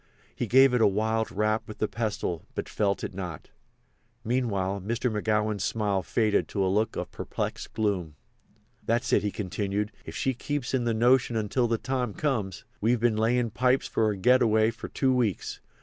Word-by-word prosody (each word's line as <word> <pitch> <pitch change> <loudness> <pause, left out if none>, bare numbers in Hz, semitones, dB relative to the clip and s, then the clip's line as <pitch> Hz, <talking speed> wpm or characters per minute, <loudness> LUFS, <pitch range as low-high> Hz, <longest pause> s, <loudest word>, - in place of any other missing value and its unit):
He 120 - -2
gave 130 +3 +6
it 125 - +3
a - - +6
wild 110 +2 0
rap 110 +2 0
with 110 - -8
the 110 - 0
pestle, 105 -8 -3
but - - -3
felt 100 -2 0
it - - -4
not. 90 -5 -7 0.7
Meanwhile 100 -6 -1
Mr. 115 +3 -1
McGowan's 105 -1 0
smile 105 -2 0
faded 110 +2 +1
to 100 -2 -1
a 95 - +1
look 110 +2 +1
of - - -4
perplexed - - -4
gloom. 95 -8 -1 0.7
"That 115 +2 +1
is," - - +5
he 105 - -1
continued, 100 +1 -2
"if - - -9
she 135 - 0
keeps 135 +1 -3
in 125 -2 +1
the 115 -1 +1
notion 120 +1 +3
until 110 +3 +1
the 115 0 +1
time 125 -3 -2
comes. 105 - -2 0.2
We've 115 +3 +2
been 115 -1 +2
layin' 115 +1 +1
pipes 125 +3 +2
for 110 -1 +1
the - - -7
getaway 110 0 +4
for 115 - -8
two 130 -1 +1
weeks. 115 -7 -1
110 Hz, 180 wpm, -27 LUFS, 100-120 Hz, 0.7 s, gave